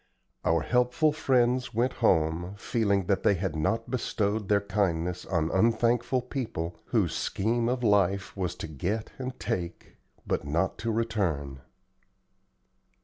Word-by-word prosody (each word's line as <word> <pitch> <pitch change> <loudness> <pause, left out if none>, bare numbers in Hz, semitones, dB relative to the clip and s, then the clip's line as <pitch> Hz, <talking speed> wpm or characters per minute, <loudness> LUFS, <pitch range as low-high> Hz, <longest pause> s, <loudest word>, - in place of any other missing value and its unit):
Our 80 0 +2
helpful 125 - +2
friends 125 -3 +1
went 125 +3 +1
home, 85 -2 +2
feeling 100 -4 0
that 100 0 +1
they 100 - +4
had 90 -3 -2
not 115 +10 -1
bestowed 105 -4 -1
their 100 -1 +5
kindness 90 -4 -1
on 85 -3 0
unthankful 115 +4 +2
people 110 - -4
whose - - +1
scheme 115 +3 0
of 125 0 -1
life 100 -3 +2
was 90 -4 -2
to - - -6
get 90 +9 -3
and 130 -1 -5
take, 85 -1 -4 0.3
but - - -1
not 80 +6 -1
to 115 - -1
return. 90 - -1
100 Hz, 135 wpm, -28 LUFS, 85-120 Hz, 0.3 s, their